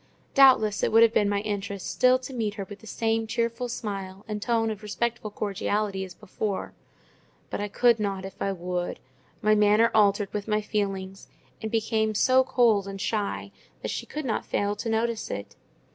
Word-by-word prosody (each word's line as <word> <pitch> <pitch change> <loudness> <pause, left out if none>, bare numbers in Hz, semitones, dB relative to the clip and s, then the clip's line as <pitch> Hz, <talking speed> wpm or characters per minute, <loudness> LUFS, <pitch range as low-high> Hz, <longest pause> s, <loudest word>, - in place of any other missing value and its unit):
Doubtless 255 -7 +6
it - - +1
would 225 +1 +7
have 230 -1 +4
been 205 -2 +3
my 200 0 0
interest 200 -2 -4
still 255 0 +4
to 255 +1 -9
meet 220 -4 -2
her 200 - -4
with 205 - -10
the 220 - -14
same 225 0 0
cheerful 230 +2 -1
smile 195 -4 -5
and 210 -1 -4
tone 225 -1 +1
of 215 -2 -6
respectful 220 +2 -2
cordiality 205 -1 -2
as 185 -2 -9
before; 200 +2 -4 0.8
but - - -2
I 205 - -1
could 235 +2 +3
not, 195 -2 -2
if 195 - -10
I 195 - +1
would: 180 -1 -3 0.4
my 215 0 +5
manner 210 +2 +4
altered 205 -2 +3
with 210 0 -3
my 215 -1 +2
feelings, 195 -2 -3 0.3
and 220 - -3
became 220 -1 0
so 260 +4 +5
cold 225 -6 +3
and 195 0 -6
shy 205 +1 -2 0.3
that - - -2
she - - -4
could 305 -1 -5
not 225 -4 -1
fail 205 0 -1
to 225 - -3
notice 225 0 -1
it. 100 0 -6
210 Hz, 190 wpm, -26 LUFS, 200-225 Hz, 0.8 s, would